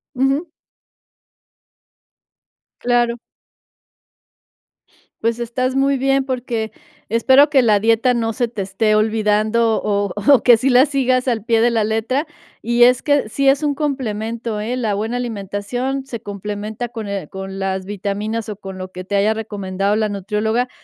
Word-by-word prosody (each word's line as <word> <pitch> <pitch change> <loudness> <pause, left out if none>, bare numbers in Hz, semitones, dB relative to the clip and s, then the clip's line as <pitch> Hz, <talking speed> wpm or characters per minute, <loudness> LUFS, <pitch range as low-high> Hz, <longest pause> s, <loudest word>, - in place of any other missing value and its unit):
Ujú. 270 +6 0 2.3
Claro. 240 -1 +1 2.0
Pues 230 +1 0
estás 255 +2 -2
muy 275 0 +2
bien, 270 +1 +2
porque, 245 -4 -3 0.4
espero 265 +5 +5
que 280 -3 +4
la 215 -4 +3
dieta 230 +3 +3
no 230 -2 0
se 240 +2 -1
te 225 -3 -6
esté 205 +3 +1
olvidando 215 +1 +2
o 200 -2 0 0.2
o 265 -5 +5
que 245 - +7
sí 255 +4 +1
la 255 +1 +6
sigas 260 -3 0
al 230 -4 0
pie 230 -1 +2
de 240 +1 +3
la 225 -2 +1
letra, 225 +7 -1 0.4
y 240 0 +3
es 250 +1 +5
que, 285 -5 +1
sí 275 +5 +2
es 275 +2 +3
un 295 -1 +1
complemento, 230 -6 -3
¿eh?, 240 +4 -2
la 225 -4 -1
buena 220 +4 -2
alimentación 245 +4 -3
se 235 -5 -7
complementa 210 +3 -5
con 225 -3 -6
el 195 -6 -4
con 190 +2 -7
las 190 -1 -2
vitaminas, 205 +3 -3
o 210 - -5
con 195 -1 -9
lo 185 0 -7
que 185 - -7
te 200 +2 -3
haya 210 +2 +3
recomendado 200 -2 -2
la 215 -1 +1
nutrióloga, 210 +4 -1
225 Hz, 155 wpm, -19 LUFS, 210-250 Hz, 2.3 s, que